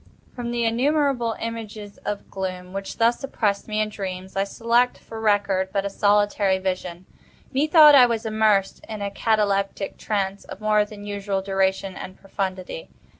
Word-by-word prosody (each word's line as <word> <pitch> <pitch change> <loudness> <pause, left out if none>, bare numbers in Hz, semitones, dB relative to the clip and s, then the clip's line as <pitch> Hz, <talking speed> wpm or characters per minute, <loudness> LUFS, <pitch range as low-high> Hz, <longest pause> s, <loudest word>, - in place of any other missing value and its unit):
From 240 -1 -4
the 240 -1 0
innumerable 255 0 +1
images 220 -3 -6
of 205 -1 -4
gloom 185 -1 -5
which 195 0 -5
thus 235 +3 +2
oppressed 210 -7 -1
me 215 -1 -2
in 215 0 +1
dreams, 190 -2 -6
I 195 0 +1
select 235 +4 +1
for 225 - -10
record 200 -3 +1
but 200 0 -1
a 200 - -2
solitary 205 -1 +2
vision. 185 -1 -4 0.5
Methought 300 +2 +7
I 255 -3 +8
was 230 -1 -2
immersed 215 -3 +1
in 215 -2 -5
a 200 - -3
cataleptic 200 -2 0
trance 200 -2 -2
of - - -10
more 215 -1 +3
than 205 -1 -11
usual 200 -1 -2
duration 195 0 0
and 185 - -8
profundity. 195 - -5
205 Hz, 160 wpm, -23 LUFS, 195-230 Hz, 0.5 s, I